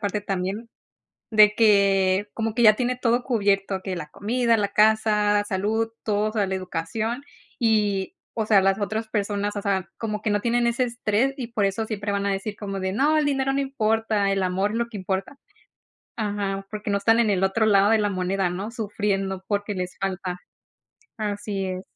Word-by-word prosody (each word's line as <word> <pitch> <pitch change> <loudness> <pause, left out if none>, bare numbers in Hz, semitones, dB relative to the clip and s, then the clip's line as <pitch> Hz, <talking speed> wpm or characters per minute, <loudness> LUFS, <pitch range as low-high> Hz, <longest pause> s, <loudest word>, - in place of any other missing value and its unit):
parte 205 0 -1
también, 195 +4 -3 0.6
de 215 -1 +6
que 200 -2 +3
como 225 -1 -2
que 240 - +1
ya 215 -1 +8
tiene 250 0 -1
todo 240 0 +2
cubierto, 200 -5 0
que 185 -2 -4
la 150 - -6
comida, 230 +7 +1
la 200 -1 +1
casa, 210 -1 +3
salud, 215 +3 0 0.2
todo, 210 0 0
o - - -12
sea, 205 -3 +1
la 190 - -2
educación 190 +7 -3 0.4
y, 210 -5 +1 0.2
o 220 -2 -1
sea, 205 -3 +5
las 195 +1 +2
otras 215 +2 -2
personas, 205 -1 -2
o 200 - -3
sea, 190 -2 -1
como 215 -2 -3
que 215 - 0
no 205 0 +1
tienen 240 +1 +1
ese 235 +2 +1
estrés 240 +2 0
y 245 -4 -5
por 220 -4 0
eso 195 +3 -1
siempre 205 -2 -3
van 200 0 -1
a 200 - +1
decir 200 +1 -4
como 195 -2 -4
de: 190 0 -2
"No, 290 +8 +2
el 295 - +1
dinero 270 -1 +1
no 275 - 0
importa, 220 -6 0
el 195 -1 0
amor 190 +3 0
es 230 - -1
lo 235 - 0
que 220 - -8
importa". 190 +8 -3 0.8
Ajá, 200 -2 -2
porque 210 0 -5
no 200 - +2
están 225 +3 +3
en 230 -3 +3
el 190 -1 +1
otro 215 +4 +2
lado 200 -1 +4
de 225 - +5
la 210 -1 +1
moneda, 185 0 -1
¿no? 190 +4 -4
Sufriendo 200 -4 -2
porque 205 0 -1
les 180 -1 -5
falta. 185 -2 -3 0.8
Así 205 -2 -3
es. 185 0 -4
205 Hz, 200 wpm, -24 LUFS, 195-225 Hz, 0.8 s, ya